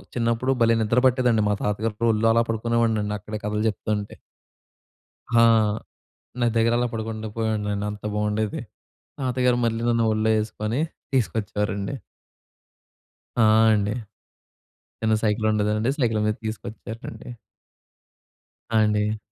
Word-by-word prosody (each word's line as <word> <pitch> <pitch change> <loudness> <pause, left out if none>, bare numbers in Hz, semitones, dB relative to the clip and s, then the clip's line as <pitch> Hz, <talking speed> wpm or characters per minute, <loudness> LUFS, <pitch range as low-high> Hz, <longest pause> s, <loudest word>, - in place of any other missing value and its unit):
చిన్నప్పుడు 115 +2 +1
భలే 115 0 +5
నిద్ర 110 +3 +2
బట్టేదండి 125 -3 +2
మా 105 - +2
తాతగారి 110 +2 -1
ఒళ్ళో 110 +1 +2
అలా 115 0 +4
పడుకునేవాడినండి, 115 -2 0
అక్కడే 105 +1 -6
కథలు 105 0 -1
జెప్తుంటే. 105 0 -3 1.2
ఆ! 115 - +7 1.0
నది 120 -1 +2
దెగ్గరలా 120 +2 +2
పడుకుండా 110 -1 -4
పోయేవాడ్నండి. 105 -2 -1
అంత 105 0 -10
బాగుండేది. 105 0 -1 0.6
తాతగారు 125 -1 +1
మళ్ళీ 115 0 0
నన్ను 115 -1 +2
ఒళ్ళో 110 +1 +1
ఎసుకొని 110 +3 -3 0.3
తీసుకొచ్చేవారండి. 105 -2 -1 1.5
ఆ! - - +6 0.3
అండి. 105 0 +1 1.1
చిన్న 110 0 +2
సైకిల్ 110 0 +1
ఉండెదండి. 105 +3 +1
సైకిల్ 115 -5 +1
మీద 105 - +1
తీసుకొచ్చేవారండి. 110 +2 -7 1.4
ఆ! 115 - +3
అండి. 105 0 0
110 Hz, 110 wpm, -24 LUFS, 105-115 Hz, 1.5 s, ఆ